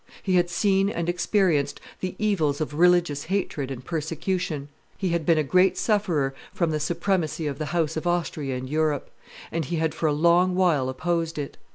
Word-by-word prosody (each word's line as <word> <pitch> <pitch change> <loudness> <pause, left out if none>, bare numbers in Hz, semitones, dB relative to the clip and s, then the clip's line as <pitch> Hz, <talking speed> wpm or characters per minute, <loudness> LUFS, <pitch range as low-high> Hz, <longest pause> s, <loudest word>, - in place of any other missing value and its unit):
He 190 - 0
had 175 -1 +3
seen 195 +2 +2
and 170 -4 -3
experienced 175 -4 +1 0.2
the 185 0 -4
evils 165 -10 +1
of 155 -1 -3
religious 170 -3 +3
hatred 160 -7 -2
and 130 -2 -7
persecution. 165 -1 -2 0.3
He 190 - -1
had 170 -2 -1
been 165 -2 +5
a 155 - +2
great 185 +5 +3
sufferer 175 -11 +1 0.2
from 170 -3 0
the 155 - -1
supremacy 170 0 -1
of 140 -1 -3
the 155 - -2
house 160 -1 0
of 160 +2 -3
Austria 160 -6 -1
in 130 +1 -6
Europe, 155 0 0 0.4
and 165 0 -1
he 170 - -3
had 160 -1 0
for 160 - -1
a - - +2
long 170 +4 +3
while 165 -8 +2
opposed 165 +4 -1
it. 145 -2 -4
165 Hz, 190 wpm, -25 LUFS, 150-180 Hz, 0.4 s, been